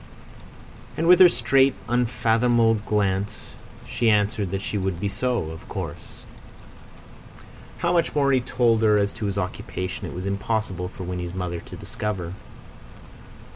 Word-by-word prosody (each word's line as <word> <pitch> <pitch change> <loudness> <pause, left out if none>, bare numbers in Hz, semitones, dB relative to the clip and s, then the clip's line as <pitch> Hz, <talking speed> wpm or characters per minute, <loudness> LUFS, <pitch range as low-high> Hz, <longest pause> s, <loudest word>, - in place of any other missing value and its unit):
And 160 - 0
with 180 +2 +7
her 185 -1 +9
straight, 135 -4 +3
unfathomable 120 -1 +2
glance 105 -1 -1 0.4
she 115 - +1
answered 105 -2 +1
that 95 +2 -3
she - - -4
would 95 -3 -2
be 100 - -1
so, 105 -5 -1
of 80 - -11
course. - - -7 1.5
How 175 0 0
much 170 -3 +1
more 140 -2 +3
he 130 -2 +3
told 120 -2 +2
her 105 -1 +4
as 100 0 0
to 105 - -4
his 100 0 -3
occupation 90 0 -4
it - - -8
was 90 +1 -5
impossible 100 -2 -2
for 95 - -9
Winnie's 90 0 -5
mother 90 -2 -3
to - - -11
discover. 95 -5 -4
105 Hz, 145 wpm, -24 LUFS, 95-120 Hz, 1.5 s, her